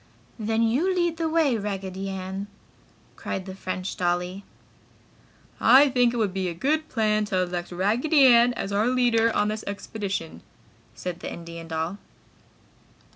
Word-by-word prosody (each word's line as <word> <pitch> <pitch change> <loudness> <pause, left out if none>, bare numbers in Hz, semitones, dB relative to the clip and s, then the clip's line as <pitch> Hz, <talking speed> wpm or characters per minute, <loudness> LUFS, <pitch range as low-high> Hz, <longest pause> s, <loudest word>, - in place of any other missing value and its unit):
"Then 220 +1 0
you 290 +12 +1
lead 345 -2 0
the 325 -1 -1
way, 310 -8 +2
Raggedy 195 -1 -4
Ann!" 190 +1 -5 0.7
cried 190 - -5
the 190 - -7
French 185 0 -5
dolly. 180 +2 -1 1.2
"I 275 +2 +7
think 245 -2 +3
it 240 - -4
would 210 -5 0
be 190 -1 -1
a 170 - -6
good 310 - 0
plan 215 -2 +1
to 195 -2 -2
elect 175 0 -4
Raggedy 240 - +3
Ann 240 -1 +6
as 200 - -4
our 205 +3 +1
leader 240 -2 +3
on 205 0 +2
this 215 0 -4
expedition!" 200 -4 -5 0.5
said 180 -1 -5
the - - -6
Indian 170 -1 -8
doll. 165 +4 -3
205 Hz, 150 wpm, -25 LUFS, 185-245 Hz, 1.2 s, I